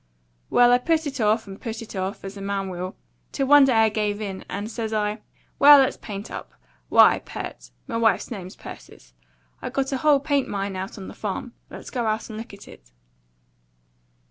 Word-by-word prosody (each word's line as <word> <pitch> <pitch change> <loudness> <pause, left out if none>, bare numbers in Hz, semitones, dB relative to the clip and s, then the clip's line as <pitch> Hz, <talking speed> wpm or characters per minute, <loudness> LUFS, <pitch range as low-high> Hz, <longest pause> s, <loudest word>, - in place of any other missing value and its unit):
Well, 245 0 +5
I 245 - +5
put 320 +4 +1
it 275 -4 -4
off, 215 +1 +2
and 195 -1 -10
PUT 225 -2 -5
it 215 - -11
off, 190 +2 -4
as 195 +1 -7
a 200 - -8
man 195 -1 -2
will, 185 +1 -5 0.4
till 275 - -1
one 290 0 +7
day 265 - +2
I 220 0 +5
give 210 -1 -1
in, 195 -3 -5
and 205 +2 -4
says 220 -1 -4
I, 210 0 -1 0.4
'Well, 290 +1 +10
let's 270 -2 +3
paint 205 0 -8
up. - - -8 0.4
Why, - - +6
Pert,' - - -8 0.2
m'wife's 230 -1 +1
name's 185 -4 -7
Persis, 60 -1 -12 0.5
'I've - - -5
got 270 0 -1
a 270 - 0
whole 295 0 +4
paint 285 -1 0
mine 200 -1 -3
out 190 +3 -5
on 190 - -8
the - - -9
farm. 215 +3 -5 0.2
Let's - - -10
go 240 -3 -1
out 220 +1 -2
and 215 - -6
look 230 - -8
at 200 0 -13
it.' - - -15
215 Hz, 200 wpm, -24 LUFS, 200-250 Hz, 0.5 s, Well